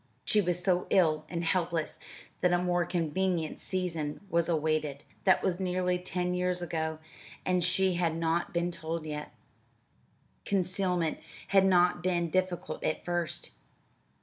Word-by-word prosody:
She 215 - +4
was 180 -1 -1
so 180 -1 +2
ill 155 -4 +3
and 170 -1 -2
helpless 170 -2 0 0.4
that 180 - +3
a 175 - +4
more 175 -1 +1
convenient 170 0 -1
season 165 -5 -2
was 170 0 +2
awaited. 155 -3 0 0.2
That 190 - +5
was 185 -1 0
nearly 180 -1 0
ten 180 0 -2
years 180 0 0
ago 160 -2 -2 0.5
and 180 -1 +2
she 190 +1 +3
had 170 -2 0
not 165 +3 0
been 175 -1 0
told 165 -1 -4
yet. 150 -1 -5 1.1
Concealment 180 -3 0 0.3
had 195 -1 +5
not 180 -1 +4
been 175 -2 0
difficult 185 -1 -1
at 155 - -1
first. 175 -3 -2
175 Hz, 140 wpm, -30 LUFS, 165-180 Hz, 1.1 s, That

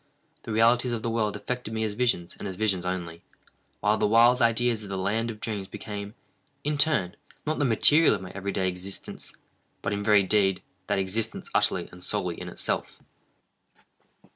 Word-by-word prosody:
The - - -7
realities 120 +3 +3
of 110 -2 -3
the 115 - -1
world 110 -2 0
affected 125 -3 -4
me 110 - 0
as 110 -2 -1
visions, 105 -7 0
and - - -5
as 95 - -5
visions 95 -3 0
only, 85 -2 -4 0.6
while 105 +1 +2
the - - +3
wild 120 +3 +5
ideas 115 -1 +2
of 105 - -9
the 95 - -3
land 110 +5 0
of 110 -2 -7
dreams 105 -4 -3
became, 105 +1 -7 0.5
in 150 0 -1
turn, 120 - +2 0.3
not 155 0 -1
the 145 - +2
material 145 +7 +5
of - - -6
my 90 - -8
every 100 +1 -4
day 95 -1 0
existence, 90 +1 -6 0.5
but - - -1
in 100 0 -2
very 105 -1 +5
deed 95 -1 +2 0.2
that 100 - +1
existence 105 +4 -2
utterly - - +1
and 90 0 -12
solely 90 -4 -2
in 90 - -5
itself. - - -3
105 Hz, 185 wpm, -27 LUFS, 95-115 Hz, 0.6 s, wild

